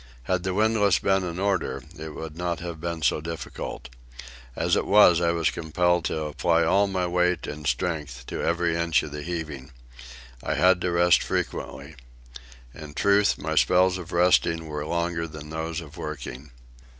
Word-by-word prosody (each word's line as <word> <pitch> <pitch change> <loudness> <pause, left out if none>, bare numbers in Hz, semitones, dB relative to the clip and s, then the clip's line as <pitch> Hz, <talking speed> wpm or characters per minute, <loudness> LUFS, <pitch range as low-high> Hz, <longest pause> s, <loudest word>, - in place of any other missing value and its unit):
Had 90 +6 0
the 95 0 -2
windlass 105 -3 +3
been 95 -1 +1
in 85 -1 -4
order 95 -2 -1
it 80 0 -8
would 80 -1 -7
not 85 0 -2
have 85 -2 -7
been 85 -2 -4
so 75 - +2
difficult; 80 -4 -6 0.7
as - - +1
it - - 0
was, 90 -5 +6
I 85 - +2
was 85 -2 +1
compelled 85 +1 0
to 80 - -1
apply 75 +3 +1
all 100 +5 +3
my 95 -2 -1
weight 90 0 +1
and 75 0 -6
strength 75 -8 -2
to - - -5
every 85 -1 +1
inch 85 -1 +2
of 75 - -7
the 75 0 -6
heaving. 75 -4 -5 0.7
I - - -2
had 90 0 +4
to 90 - 0
rest 85 0 +4
frequently. 70 +3 -4 0.8
In 75 -1 -10
truth, 100 +2 +3
my 80 +1 -3
spells 90 +3 +3
of 90 - -9
resting 85 -2 +3
were 75 -1 -5
longer 85 0 -1
than 75 0 -10
those 80 +1 -3
of 75 -3 -12
working. 65 +4 -7
85 Hz, 175 wpm, -25 LUFS, 80-90 Hz, 0.8 s, was